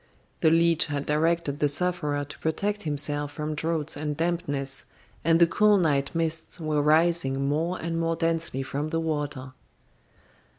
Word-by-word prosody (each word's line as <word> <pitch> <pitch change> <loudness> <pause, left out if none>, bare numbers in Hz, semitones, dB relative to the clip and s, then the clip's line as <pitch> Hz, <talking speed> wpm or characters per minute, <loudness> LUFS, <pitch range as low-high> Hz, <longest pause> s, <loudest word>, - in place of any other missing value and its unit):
The 160 - +4
leech 165 0 +3
had 145 -1 -3
directed 155 -1 0
the 150 - +3
sufferer 150 -2 0
to 145 - -11
protect 205 +6 -1
himself 145 -2 0
from 150 +1 -3
draughts 160 0 0
and 150 0 -3
dampness, 145 -5 -2 0.4
and 165 +1 +4
the 170 - +7
cool 210 +4 +4
night 150 -5 0
mists 165 +1 -2
were 155 -2 0
rising 150 -3 +2
more 165 +5 -1
and 165 0 -3
more 165 0 0
densely 165 -4 -1
from 145 +3 -3
the 165 - -1
water. 145 -5 -3
155 Hz, 155 wpm, -26 LUFS, 145-165 Hz, 0.4 s, the